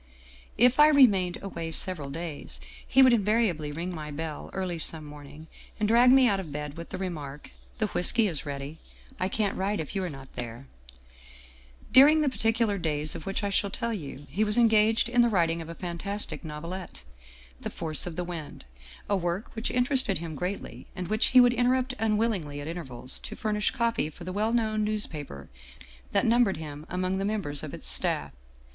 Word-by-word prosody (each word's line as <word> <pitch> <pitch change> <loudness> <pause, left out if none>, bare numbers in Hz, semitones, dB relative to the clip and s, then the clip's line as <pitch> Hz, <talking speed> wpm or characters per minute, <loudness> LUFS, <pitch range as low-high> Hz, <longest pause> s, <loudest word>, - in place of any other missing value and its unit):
" 65 -1 -24
If 250 +4 +5
I 300 - +9
remained 205 -12 +4
away 170 -4 -5
several 160 -3 +1
days, 160 +1 -6 0.3
he 265 +1 +6
would 255 -2 +6
invariably 205 -8 +1
ring 170 +4 -4
my 155 -2 -6
bell 155 0 -6
early 185 -3 -3
some 160 -1 -3
morning, 150 +1 -11 0.3
and 210 - +1
drag 240 +3 +6
me 265 -1 +6
out 200 -3 +2
of 170 -6 -7
bed 150 0 -5
with 170 0 -8
the 185 - -5
remark: 150 -7 -6 0.3
'The 220 - +1
whisky 215 +3 +2
is 160 -7 -4
ready. 145 +2 -6 0.4
I 185 - 0
can't 205 -1 0
write 200 +1 -1
if 160 +4 -5
you 195 - -1
are 180 - -2
not 135 -3 -10
there/ 120 +1 -6 0.7
" 65 -1 -23
During 305 +3 +6
the 295 - +2
particular 225 -4 0
days 155 -2 0
of 160 - -8
which 195 +1 -2
I 200 - -1
shall 200 0 +1
tell 235 +3 -3
you, 145 -7 -7
he 210 - +1
was 210 +1 +3
engaged 225 -1 +4
in 240 0 +3
the 240 - +4
writing 170 -5 +1
of 165 - -9
a 170 - -7
fantastic 185 +5 -4
novelette, 165 - -7 0.3
' 65 0 -23
The - - -4
Force 160 -1 -1
of 170 - -6
the 180 - -2
Wind,' 170 -4 -7 0.4
a 205 - +1
work 175 +2 -3
which 225 - -2
interested 250 -5 +2
him 165 0 -6
greatly, 175 -7 -5
and 185 -2 -5
which 215 +2 +2
he 255 - +6
would 245 -1 +6
interrupt 255 +2 +1
unwillingly 210 -9 0
at 145 - -6
intervals 135 -7 -6
to - - -8
fur 215 - -2
nish 210 0 +2
copy 230 -10 0
for 165 +3 -12
the 185 +1 -5
well 215 +3 0
known 220 -2 +1
newspaper 155 - -4 0.6
that - - +2
numbered 230 -5 +3
him 150 0 -8
among 185 +1 -1
the - - -1
members 195 -9 -2
of - - -6
its - - +1
staff. - - +3
185 Hz, 200 wpm, -27 LUFS, 150-220 Hz, 0.7 s, I